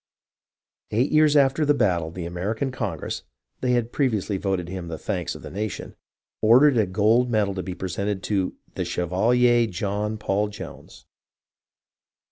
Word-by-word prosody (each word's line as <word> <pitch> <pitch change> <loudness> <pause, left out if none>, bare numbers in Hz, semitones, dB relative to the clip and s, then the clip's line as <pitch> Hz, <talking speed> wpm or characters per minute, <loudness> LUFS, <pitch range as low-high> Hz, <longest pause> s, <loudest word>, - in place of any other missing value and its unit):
Eight 120 +6 +1
years 155 -1 +5
after 140 +2 +3
the 145 0 +3
battle 90 - +1
the 85 +1 -6
American 105 +10 -2
Congress 130 - -4 0.4
(they 125 -1 +1
had 120 -1 0
previ 130 -6 +2
ously 100 0 -3
voted 95 -3 -2
him 90 -1 -6
the 80 -1 -5
thanks - - -3
of - - -11
the - - -8
nation) 105 0 -5 0.5
ordered 130 +6 +6
a 110 -4 +3
gold 110 +6 +3
medal 105 -4 +1
to 95 - -3
be 90 -1 -6
presented 95 +2 -3
to 95 -3 -1 0.2
"the - - -2
Chevalier 120 +7 +2
John 105 +3 -2
Paul 105 0 0
Jones." 105 - -10
105 Hz, 155 wpm, -24 LUFS, 95-120 Hz, 0.5 s, ordered